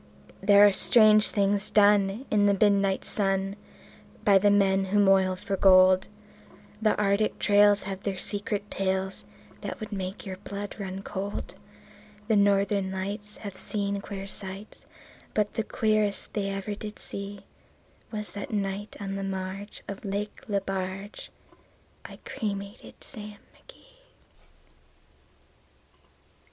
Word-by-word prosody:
There 200 +1 +7
are 205 - +6
strange 215 +1 +6
things 200 0 0
done 205 +2 +3
in 205 -1 +4
the 200 - +4
midnight 200 -2 +2
sun 195 -1 -1 0.7
By 200 -3 +6
the 205 +1 +4
men 195 -1 +3
who 195 +2 0
moil 190 -2 +4
for 195 +2 -3
gold; 185 -1 +6 0.7
The 215 -1 +2
Arctic 205 +1 +1
trails 205 0 +4
have 195 0 -5
their 195 -2 -3
secret 205 +1 -4
tales 190 0 -2 0.4
That - - -6
would 215 -2 -7
make 190 0 -5
your 190 -1 -6
blood 200 +1 -7
run 195 -1 -5
cold; 200 0 -5 0.7
The 220 - +3
Northern 200 -1 +2
Lights 205 +2 -5
have 200 -2 -6
seen 200 -1 -3
queer 195 -1 -7
sights, 195 +1 -6 0.5
But 210 -1 +1
the - - -1
queerest 215 -2 0
they 200 -2 -1
ever 195 +1 -4
did 210 +1 -7
see 200 0 -6 0.7
Was 210 -1 -6
that 205 - -6
night 200 0 -3
on 195 -1 -4
the 195 - -4
marge 195 +1 -5
of 200 0 -7
Lake 205 +3 -4
Lebarge 195 0 -4 0.8
I - - -10
cremated 200 -1 -6
Sam 210 -4 -9 0.2
McGee. - - -19
200 Hz, 130 wpm, -27 LUFS, 195-210 Hz, 0.8 s, There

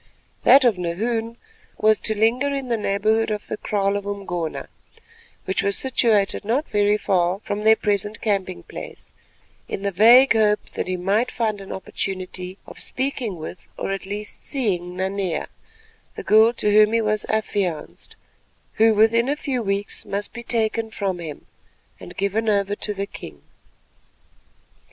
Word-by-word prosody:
That 270 -1 +7
of 220 -7 +3
Nahoon 225 +7 -2 0.4
was 215 0 +3
to 220 -1 -2
linger 235 +6 +2
in 275 -2 -3
the 235 - +2
neighbourhood 215 +1 +1
of 210 -1 -3
the - - -4
kraal 200 -2 0
of 200 0 -4
Umgona, 175 -5 -4 0.8
which 190 - 0
was 200 0 +1
situated 225 -7 +2
not 245 +9 0
very 205 0 +2
far 180 -2 +1
from 210 0 -4
their 220 +1 +6
present 205 0 -1
camping 195 - -2
place, - - -10 0.6
in 195 - -4
the 200 - 0
vague 235 +8 +7
hope 210 -2 +2
that - - -4
he 185 0 -1
might 200 +7 +1
find 215 -4 -2
an 195 - -9
opportunity 185 -1 -5
of - - -11
speaking 260 -7 -3
with 160 +3 -9
or - - -3
at 195 0 -4
least 210 +1 -5
of - - -18
seeing 180 - -2
Nanea, 190 -1 -2 0.7
the - - -6
girl 220 +2 +6
to 210 -3 0
whom 215 +1 +5
he 230 - +3
was 215 -1 0
affianced, 200 -6 -2 0.7
who 225 -1 +6
within 230 +4 +4
a 290 - +1
few 270 -4 -2
weeks 200 -1 -2
must 200 +1 -4
be 235 - -6
taken 225 -1 -1
from 195 -4 -3
him, 155 -4 -8 0.5
and - - -11
given 210 +3 0
over 200 -1 +1
to 210 0 -3
the 200 0 -2
king. 75 - -11
210 Hz, 160 wpm, -22 LUFS, 195-225 Hz, 0.8 s, That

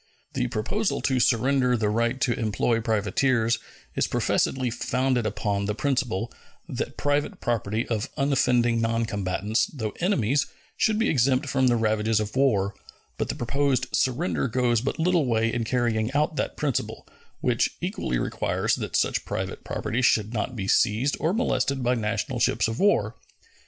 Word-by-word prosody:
The - - 0
proposal 195 - -1
to 130 -2 +1
surrender 125 +1 +2
the 105 -2 0
right 115 +4 0
to 120 - +2
employ 115 +1 0
privateers 115 +2 +1 0.4
is - - +1
professedly 130 -2 0
founded 125 0 0
upon 100 -1 -1
the 105 +1 -2
principle 125 -5 -1 0.3
that - - -4
private 145 +1 0
property 115 -1 -1
of 115 +2 -2
unoffending 125 -4 +2
noncombatants, 110 -2 0
though 110 -7 -4
enemies, 145 - +1 0.3
should 220 -2 +2
be 225 - +2
exempt 130 -1 +2
from 130 -1 +2
the 120 - +3
ravages 110 -1 +1
of 110 +1 -4
war; 105 -8 +2 0.5
but - - -1
the - - -2
proposed 130 +1 0
surrender 130 +4 0
goes 120 -1 +1
but 135 - -2
little 170 -3 +2
way 115 -1 +1
in 120 -1 -1
carrying 115 -2 0
out 150 +3 +1
that - - -2
principle, 145 -5 -2 0.3
which - - +1
equally 60 - -2
requires - - -1
that - - -4
such - - +1
private - - -4
property 120 - -2
should 110 -2 +2
not 120 +3 -2
be 95 -4 -4
seized 120 +8 +2
or 160 - +1
molested 140 - 0
by 125 +1 +2
national 110 -2 -2
ships - - +2
of 115 0 -4
war. 125 - +2
120 Hz, 155 wpm, -25 LUFS, 110-135 Hz, 0.5 s, the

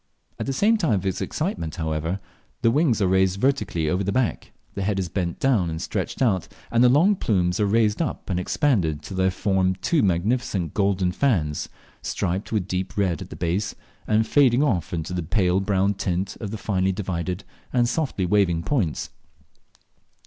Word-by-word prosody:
At - - -3
the - - 0 0.3
time 165 - +1
of 95 -2 -1
its 95 - -1
excitement, 80 -2 -3
however, 80 +3 -2 0.4
the 115 - +5
wings 130 -6 +2
are - - +3
raised 95 +1 +2
vertically 130 - 0
over 90 +5 +1
the 100 - -1
back, 125 +1 -1 0.2
the 100 - -4
head 100 +1 0
is 95 -3 -2
bent 85 -1 -2
down 115 -11 +2
and 80 0 -4
stretched 130 - -2
out, 95 -8 +1 0.2
and 115 +1 +4
the 125 - +7
long 170 +11 +5
plumes 90 - 0
are 105 - +2
raised 110 +2 +2
up 160 - -3
and 90 -2 -1
expanded 90 - 0
till 95 - -7
they 95 0 +3
form 95 0 +1
two 155 - +1
magnificent 95 - 0
golden 95 -3 +1
fans, 90 - 0 0.3
striped 95 +5 -2
with 105 -5 0
deep 95 +1 -3
red 95 -5 +1
at - - -8
the - - -8
base, 90 +4 -1 0.3
and 110 +1 +3
fading 135 +1 +4
off 100 - 0
into 85 +1 -3
the 90 - -1
pale 90 +2 +1
brown 100 0 +1
tint 95 0 -2
of 105 - -4
the 110 - -5
finely 95 -3 0
divided 90 -1 -3 0.3
and 120 -1 +2
softly 125 - -1
waving 90 -3 +2
points. 100 - -1
95 Hz, 185 wpm, -24 LUFS, 90-115 Hz, 0.4 s, the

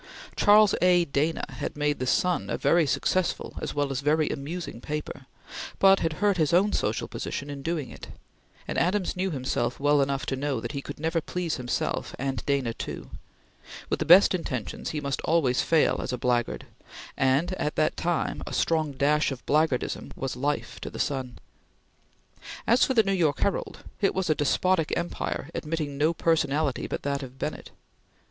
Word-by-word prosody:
Charles 210 0 +6
A. 180 -1 +5
Dana 150 +3 0
had - - -5
made 145 0 0
the 130 - -2
Sun 180 +6 +1
a - - -1
very 170 -3 +3
successful 185 +6 0
as - - -4
well 145 -1 0
as 135 0 -2
a - - -17
very 155 +1 +2
amusing 145 -3 -5
paper, 150 -2 -5 0.5
but 195 0 +6
had 165 -1 -1
hurt 200 +3 +1
his 155 -1 +1
own 200 +4 +4
social - - -1
position 145 0 -5
in 140 -1 -6
doing 160 -2 -3
it; - - -10 0.6
and - - -1
Adams 185 +1 +1
knew 185 +1 -1
himself 130 -5 -2
well 145 0 +3
enough 135 -2 -1
to 135 - -1
know 135 -2 -1
that - - -5
he 140 -2 -4
could 145 - -8
never 165 +2 0
please 175 0 -3
himself 125 -2 -2
and 130 -3 -3
Dana 135 -5 +1
too; - - -7 0.8
with - - +1
the 155 - -1
best 180 +6 +8
intentions, 130 - -3
he 155 - -3
must 140 -2 -3
always 145 -7 +2
fail 160 -2 +2
as - - -3
a 125 - -2
blackguard, 120 -2 0 0.5
and 135 +7 +2
at 150 - -1
that 155 - +1
time 170 -1 -1
a - - -5
strong 160 -3 +1
dash 145 +3 +2
of 130 -2 -7
blackguardism 150 -4 0
was 135 -2 -4
life 145 +4 -2
to - - -5
the - - -9
Sun. 130 -4 -2 1.3
As 235 +3 +4
for 265 - +2
the 225 - +6
New 195 -1 0
York 160 -6 +1
Herald, 200 - -1 0.2
it 195 - +2
was 185 -4 +1
a - - +6
despotic 160 +3 +1
empire 170 -3 -3
admitting 150 -3 -3
no 155 +2 +4
personality 155 -4 0
but - - -4
that 140 0 -1
of 130 -1 -9
Bennett. - - -5
150 Hz, 185 wpm, -27 LUFS, 135-170 Hz, 1.3 s, best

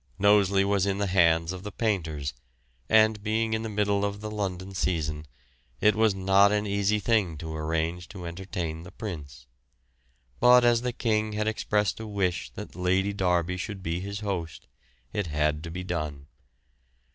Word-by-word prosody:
Knowsley 100 -1 +4
was 100 -1 +1
in 100 -1 0
the 100 - 0
hands 85 -3 +3
of 95 -1 -6
the 105 +1 -7
painters, 80 -11 -2 0.6
and, 110 -1 +4
being 110 +1 0
in 110 - 0
the 115 - -4
middle 100 -1 +1
of 100 0 -2
the 105 0 -6
London 95 -2 -4
season, 75 -5 -2 0.5
it 105 - +5
was 110 -2 +2
not 95 +1 +4
an 105 0 +1
easy 100 +1 +1
thing 100 -7 +1
to 80 +1 -6
arrange 80 +3 -2
to 90 -4 -8
entertain 85 -2 -4
the 90 - -10
Prince; 75 - -7 0.9
but 125 0 +7
as 120 -1 +4
the 125 0 -1
King 110 -3 0
had 105 +1 -1
expressed 105 -1 0
a 110 - -6
wish 95 -4 -1
that - - -8
Lord 95 +3 +1
Derby 90 -2 +1
should 95 +1 -5
be 85 0 -2
his 100 +2 -5
host, 90 -6 -4 0.5
it 105 -4 -1
had 75 0 0
to - - -6
be 90 +2 -5
done. 75 -6 -4
95 Hz, 170 wpm, -27 LUFS, 85-105 Hz, 0.9 s, but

